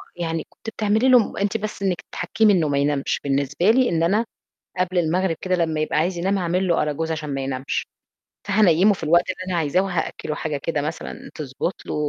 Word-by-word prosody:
يعني 165 -2 -3
كنتِ - - -9
بتعملي 220 +3 +1
لهم 250 -4 +4
أنتِ 200 +2 0
بس 215 -1 -6
إنِّك 185 -3 0
تحكّمي 220 -2 +2
إنه 170 -5 +2
ما 140 - +1
ينامش 140 0 0
بالنسبة 140 +6 +1
لي، 255 +1 +3
إن 165 -1 +1
أنا 205 +7 +2 0.5
قبل 185 0 0
المغرب 175 +1 +1
كده 185 -1 +1
لمّا 160 -3 0
يبقى 155 - -1
عايز 175 +3 0
ينام 190 +3 0
هاعمل 180 +1 0
له 170 - +2
أراجوز 150 +2 -2
عشان 150 -2 -3
ما 135 - -2
ينامش، 135 0 -3 0.6
فهانيّمه 195 -1 +4
في 185 - -8
الوقت 170 +4 +3
اللي 185 0 -4
أنا 175 - 0
عايزاه 160 +4 +2
وهأكّلُه 175 -4 -3
حاجة 155 -2 -3
كده 150 +1 -2
مثلًا 155 +3 -6
تضبط 150 +5 -4
له - - -4
170 Hz, 200 wpm, -22 LUFS, 155-195 Hz, 0.6 s, لهم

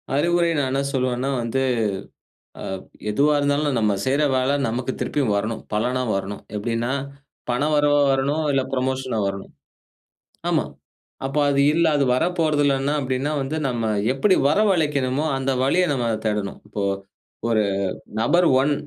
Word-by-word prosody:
அறிவுரை 170 +3 +2
நான் 135 -2 0
என்ன 135 +1 +1
சொல்லுவேன்னா 130 0 0
வந்து, 115 +3 -1 1.0
அ - - -6 0.5
எதுவா 145 +8 +3
இருந்தாலும் 145 -1 +1
நம்ம 105 -2 +2
செய்ற 140 +3 +2
வேல 130 +1 +1 0.2
நமக்கு 120 +3 -2
திருப்பியும் 135 -8 0
வரணும். 110 +2 -3
பலனா 125 +4 0
வரணும். 95 +1 -4
எப்டின்னா 115 +3 -1 0.6
பணம் 145 +5 +1
வரவா 145 0 +3
வரணும், 140 +4 0
இல்ல 135 -1 +2
புரமோஷனா 130 -2 -1
வரணும். 100 0 -5 1.0
ஆமா. - - +2 0.6
அப்ப 135 +2 -5
அது 140 0 +2
இல்ல, 165 +2 +3
அது 140 - +2
வரப்போறது 155 0 +1
இல்லன்னா 140 +1 +1
அப்டின்னா 130 +2 -1
வந்து 135 +4 -3
நம்ம 120 -3 -2 0.3
எப்டி 185 +9 +3
வரவழைக்கணுமோ 150 -7 +1
அந்த 135 0 -1
வழிய 170 +8 +3
நம்ம 125 -4 -1 0.2
தேடணும். 105 -2 -2
இப்போ, 105 -1 -4 0.7
1 110 -2 +3 0.6
நபர் 170 +10 +3
1 145 +2 +2
135 Hz, 135 wpm, -22 LUFS, 120-145 Hz, 1.0 s, எதுவா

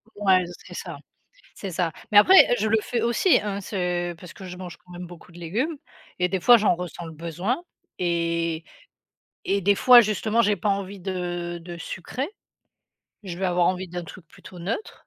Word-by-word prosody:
Ouais, 190 -3 +3
c 175 - -9
c'est - - -11
ça, - - -6 0.6
c'est 195 - -6
ça. 170 -1 -1 0.2
Mais 205 - +8
après, 375 - +8
heu, - - +6
je 220 - +1
le 220 - +3
fais 240 - -2
aussi, 240 +10 +3
hein, 200 -1 -3
ce 180 -3 -2
parce 170 0 -12
que 190 - -12
je 180 -1 -8
mange 180 -2 -8
quand 180 - -24
même 175 0 -7
beaucoup 175 0 -14
de 175 - -13
légumes 230 - -2 0.4
et 180 - +2
des 190 0 -1
fois, 240 +7 +8
j'en 210 -5 +3
ressens 175 -1 -7
le 160 - -8
besoin 175 - -3 0.4
et 170 -2 -1 0.8
et 200 0 0
des 200 +2 +4
fois, 250 +3 +8
justement, 215 +2 +1
j'ai 210 -2 +2
pas 200 - -2
envie 200 0 -2
de 175 -2 -4
de 175 0 -8
sucré. 220 - -5 1.0
Je 175 -2 -6
vais 195 - -2
avoir 175 -1 +2
envie 185 0 -1
d'un 175 0 -5
truc 165 +1 -12
plutôt 180 - -14
neutre 200 - -5
180 Hz, 200 wpm, -24 LUFS, 175-205 Hz, 1.0 s, Mais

